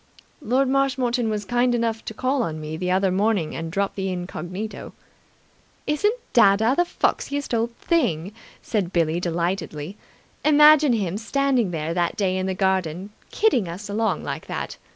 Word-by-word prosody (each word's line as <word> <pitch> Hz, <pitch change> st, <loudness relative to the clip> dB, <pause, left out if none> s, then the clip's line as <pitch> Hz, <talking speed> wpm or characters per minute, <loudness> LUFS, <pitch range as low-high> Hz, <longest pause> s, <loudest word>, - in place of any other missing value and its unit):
"Lord 265 Hz, +1 st, +1 dB
Marshmoreton 260 Hz, -3 st, +1 dB
was 210 Hz, -1 st, -3 dB
kind 245 Hz, +3 st, +2 dB
enough 230 Hz, -1 st, -1 dB
to 220 Hz, -, -6 dB
call 260 Hz, +3 st, 0 dB
on 160 Hz, -8 st, -3 dB
me 155 Hz, 0 st, -5 dB
the 180 Hz, +3 st, -3 dB
other 190 Hz, +1 st, +2 dB
morning 195 Hz, -4 st, 0 dB
and 165 Hz, 0 st, -5 dB
drop 195 Hz, +2 st, -1 dB
the 195 Hz, -1 st, -3 dB
incognito." 180 Hz, +3 st, -6 dB, 0.9 s
"Isn't 415 Hz, +10 st, +1 dB, 0.2 s
dadda 220 Hz, +2 st, +5 dB
the 350 Hz, -, +2 dB
foxiest 285 Hz, -5 st, -1 dB
old 230 Hz, +1 st, 0 dB
thing!" 205 Hz, -, 0 dB, 0.3 s
said 200 Hz, -6 st, -1 dB
Billie 165 Hz, -1 st, +1 dB
delightedly. 175 Hz, 0 st, -3 dB, 0.5 s
"Imagine 300 Hz, -2 st, +6 dB
him 200 Hz, -3 st, -1 dB
standing 260 Hz, -2 st, +1 dB
there 160 Hz, -1 st, -3 dB
that 175 Hz, -1 st, -1 dB
day 190 Hz, -3 st, +1 dB
in 185 Hz, 0 st, -1 dB
the 190 Hz, -, -2 dB
garden, 190 Hz, 0 st, -1 dB, 0.2 s
kidding 325 Hz, -, +2 dB
us 185 Hz, +5 st, -7 dB
along 220 Hz, +2 st, -1 dB
like -, -, -5 dB
that! -, -, -5 dB
205 Hz, 155 wpm, -23 LUFS, 180-245 Hz, 0.9 s, Imagine